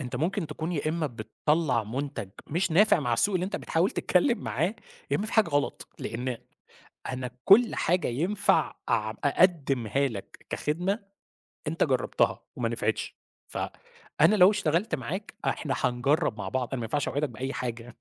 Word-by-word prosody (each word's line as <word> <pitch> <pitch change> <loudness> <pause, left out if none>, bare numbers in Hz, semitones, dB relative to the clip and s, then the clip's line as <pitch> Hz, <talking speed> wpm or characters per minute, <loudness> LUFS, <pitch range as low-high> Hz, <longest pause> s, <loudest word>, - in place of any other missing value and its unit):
أنت 125 -2 -4
ممكن 165 +5 -1
تكون 160 +3 -4
يا 155 -1 -1
إما 160 0 0
بتطَلّع 125 +2 0
منتج 130 -1 -4 0.2
مش 175 +4 0
نافع 195 +2 +5
مع 120 -4 -1
السوق 200 - +2
اللي 180 - +1
أنت 195 - -3
بتحاول 170 +4 +1
تتكلم 235 +6 +2
معاه، 170 - -1 0.4
يا - - +3
إما 210 - -2
في - - -6
حاجة 220 -6 +4
غلط، 145 -1 -1
لإن 125 +1 -3 0.7
أنا 125 -1 -4
كل 230 +5 +6
حاجة 180 +2 +1
ينفع 170 - +1
أعم 110 0 +1
أقدّمها 140 - +2
لك 105 -6 -9
كخدمة، 180 +8 -1 0.7
أنت - - +1
جرّبتها، - - +1
وما - - -1
نفعتش. - - -2 0.3
فأنا 475 - 0
لو 185 0 +7
اشتغلت 195 0 +1
معاك، 170 - -5
إحنا 145 -3 -1
هنجرب 125 +1 +1
مع 95 -2 -4
بعض، 125 +1 -1
أنا 135 - -1
ما 115 - -3
ينفعش 145 +6 -1
أوعدك 145 +1 -1
بأي 130 +4 -4
حاجة. 120 -2 -5
150 Hz, 160 wpm, -28 LUFS, 125-185 Hz, 0.7 s, لو